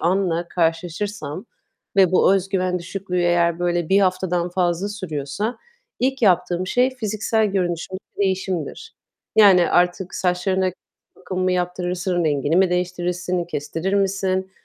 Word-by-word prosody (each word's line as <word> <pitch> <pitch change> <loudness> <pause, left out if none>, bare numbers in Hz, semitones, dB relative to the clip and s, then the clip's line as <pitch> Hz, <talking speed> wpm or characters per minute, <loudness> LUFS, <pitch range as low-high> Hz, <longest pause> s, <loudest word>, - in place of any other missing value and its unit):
anla 175 -1 0
karşılaşırsam 170 +1 -2 0.5
ve 185 -2 +5
bu 190 +1 +5
öz 195 0 -1
güven 185 -2 0
düşüklüğü 180 +1 -4
eğer, 175 -1 +2
böyle, 175 -2 0
1 195 +1 +4
haftadan 185 -2 0
fazla 180 +1 0
sürüyorsa 185 - -4 0.4
ilk 265 0 0
yaptığım 180 -2 +2
şey 250 +5 +2
fiziksel 220 -1 0
görünüşümdeki 185 -1 -3
değişimdir. 190 - -2 0.4
Yani, 190 -5 +6
artık 180 +1 +1
saçlarına 185 +1 0 0.5
bakım 185 0 -5
mı 185 0 +2
yaptırırsın, 180 0 -1
rengini 145 +1 +1
mi 185 -1 +4
değiştirirsin, 180 0 -1
kestirir 165 +4 -3
misin 190 -1 0
180 Hz, 125 wpm, -22 LUFS, 175-195 Hz, 0.5 s, Yani